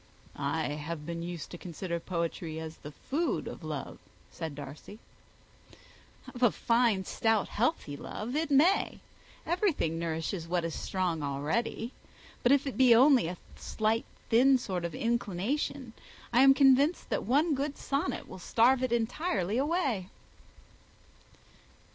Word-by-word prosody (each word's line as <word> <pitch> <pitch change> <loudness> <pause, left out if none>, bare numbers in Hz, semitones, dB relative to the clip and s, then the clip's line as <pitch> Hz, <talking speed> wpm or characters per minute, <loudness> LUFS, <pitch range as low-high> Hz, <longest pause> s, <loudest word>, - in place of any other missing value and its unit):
"I - - -1
have 150 +1 -5
been 170 +1 -4
used 170 -1 -6
to 175 - -8
consider 170 0 -4
poetry 170 -2 -3
as 160 0 -7
the 150 - -9
food 310 - -2
of - - -8
love," - - -5 0.3
said 160 -4 -6
Darcy. 145 +8 -9 1.4
"Of 245 - -9
a 245 - +6
fine, 230 -4 +1
stout, 225 0 +1
healthy 230 - -1
love 220 - -6
it 320 +1 0
may. 310 +8 +3 0.5
Everything 330 - 0
nourishes 165 +1 -3
what 175 -1 0
is 165 - -3
strong 180 -4 -2
already. 150 - -2 0.5
But 245 - +3
if 280 0 +4
it 270 - -4
be 250 -3 +7
only 255 - +6
a 175 +1 -5 0.2
slight, 220 +1 -1 0.2
thin 260 +4 +6
sort 185 -8 -3
of 170 - -4
inclination, 235 +2 -2 0.4
I 240 - +6
am 270 0 +7
convinced 275 +4 +4
that - - +1
one 295 - +2
good 280 +1 -2
sonnet 280 +6 -2
will - - -10
starve 245 +8 +3
it 255 -2 0
entirely 225 - 0
away." 275 - 0
225 Hz, 140 wpm, -30 LUFS, 170-270 Hz, 1.4 s, be